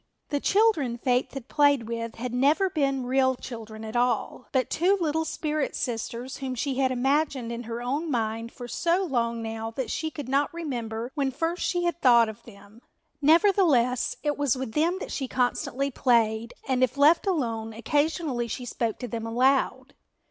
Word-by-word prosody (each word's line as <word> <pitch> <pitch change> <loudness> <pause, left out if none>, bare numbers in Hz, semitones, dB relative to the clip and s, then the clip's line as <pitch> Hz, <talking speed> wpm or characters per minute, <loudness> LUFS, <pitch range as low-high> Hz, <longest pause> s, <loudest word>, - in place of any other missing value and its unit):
The 290 - 0
children 335 - +2
Faith 250 +2 0
had 265 -2 -6
played 285 -6 +3
with 230 0 -4
had 245 +1 -5
never 300 +10 +3
been 275 -5 0
real 260 +1 +2
children 220 -3 -8
at 220 +2 -7
all, 245 +1 0
but 260 -3 0
two 375 +4 +3
little 320 -1 0
spirit 305 -1 -2
sisters 240 +1 -4
whom 265 -2 -4
she 265 +2 -2
had 265 -1 +3
imaged 275 +4 +1
in 235 -1 -5
her 235 +1 -5
own 290 +7 -2
mind 230 -2 -2
for 245 - -9
so 345 - +1
long 235 -7 -1
now 225 0 -4
that 250 +3 -4
she 315 - -2
could 285 -3 -7
not 275 +2 +1
remember 240 -8 -4
when 280 -3 0
first 330 +6 -2
she 350 -1 0
had 345 -1 -1
thought 235 -3 +6
of 215 - -9
them. 205 0 -15 0.4
Nevertheless, 310 - +3
it 295 -1 -1
was 280 -3 +2
with 260 -3 -4
them 330 +7 +1
that - - -6
she 270 - -3
constantly 255 +2 -1
played 230 -2 +1
and, 260 -1 +2
if 255 +2 0
left 310 +7 +5
alone, 230 - -1
occasionally 290 +1 -1
she 250 +2 -5
spoke 230 -2 -2
to 245 - -5
them 225 -1 -4
aloud. 260 +4 +1
255 Hz, 180 wpm, -26 LUFS, 235-295 Hz, 0.4 s, thought